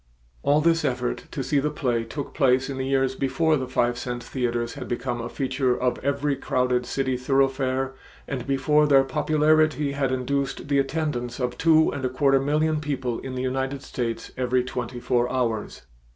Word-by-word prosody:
All 145 +2 +3
this 165 0 +3
effort 125 -3 -2
to 140 - -4
see 145 +2 +1
the 150 +2 0
play 125 -6 -1
took 135 +5 -6
place 135 -1 +2
in 135 - -5
the 130 - -2
years 135 -1 +1
before 155 +4 +1
the 130 -3 -2
five 120 -1 0
cent 120 -1 -4
theaters 120 -2 -2
had 140 -3 -7
become 120 0 -2
a - - -5
feature 130 -2 0
of 125 -1 0
every 140 +1 0
crowded 125 -2 0
city 130 -1 -1
thoroughfare 135 0 +1 0.3
and 130 -2 -4
before 150 +2 +3
their 135 -2 +6
popularity 155 +1 +2
had 140 -2 -1
induced 135 +2 -2
the 140 -1 +3
attendance 135 -4 -2
of 125 -1 -1
two 160 0 +4
and 140 - -5
a 130 - +1
quarter 135 +1 +3
million 150 +2 +1
people 130 -5 -2
in 130 -1 -6
the 130 - -2
United 135 +1 -2
States 115 -2 -4
every 125 0 +1
twenty 125 -1 -5
four 120 0 +1
hours. 115 - -2
135 Hz, 180 wpm, -25 LUFS, 125-140 Hz, 0.3 s, their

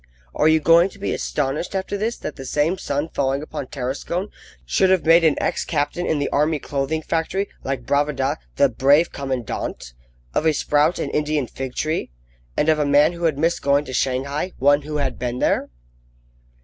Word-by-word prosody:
Are 150 - +2
you 160 0 +5
going 165 +4 +5
to 200 - -16
be 200 - -2
astonished 150 +6 -2
after 190 +1 -2
this 220 +4 -2
that - - -6
the 135 - -8
same 150 +7 0
sun 145 +3 -2
falling 135 0 -1
upon 140 -3 -6
Tarascon 145 +10 -4 0.3
should 190 - +2
have 185 -3 +2
made 165 +1 +6
of - - +6
an 155 - +2
ex - - -1
captain 150 +3 -1
in 155 - +1
the 145 - 0
Army 150 +2 +1
Clothing 145 +2 -2
Factory, 175 +6 -1 0.2
like 130 -3 -3
Bravida, 145 0 0 0.2
the 140 - +5
"brave 140 +6 +3
commandant;" 130 - -4 0.4
of 160 - +1
a 155 - +4
sprout 150 +3 +2
an - - -3
Indian 150 -2 0
fig 130 +1 -7
tree; 155 +2 -1 0.5
and 150 - +2
of 155 -1 +3
a - - +3
man 145 +4 +4
who 170 0 -3
had 155 -4 +1
missed 165 +3 +1
going 140 +1 +2
to 130 - -7
Shanghai 140 +7 -1
one 145 +2 +4
who 150 +1 -4
had 140 -2 -2
been 120 0 -2
there? - - +1
150 Hz, 195 wpm, -22 LUFS, 140-165 Hz, 0.5 s, made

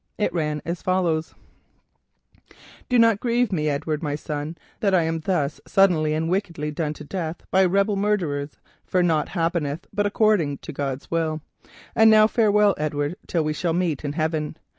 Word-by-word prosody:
It 210 - 0
ran 150 -3 -2
as 170 +1 -4
follows: 170 -4 0 1.5
"_Do 250 -1 +3
not 230 -3 +5
grieve 240 0 +1
for 190 - -1
me, 155 -2 0
Edward, 150 +1 -2
my 145 -3 -2
son, 150 +2 -5 0.2
that 195 -3 +2
I 175 - +3
am 165 0 -1
thus 155 -4 -1
suddenly 155 -6 +3 0.5
done 150 0 -2
to 150 - -10
death 165 +1 -5
by 190 +1 +5
rebel 200 +3 +2
murderers, 170 -9 -1 0.3
for 180 -1 +1
nought 160 -3 +1
happeneth 165 -3 -2
but 205 0 +1
according 205 -9 +2
to 155 - -9
God's 135 -1 -4
will. 160 -2 -1 0.5
And 220 0 +6
now 215 0 +7
farewell, 210 -2 +3
Edward, 150 +1 -1
till 165 -3 0
we 155 0 -1
shall 165 +2 -1
meet 170 -5 -1
in 145 -1 -3
heaven. 155 -1 -2
165 Hz, 165 wpm, -23 LUFS, 150-195 Hz, 1.5 s, now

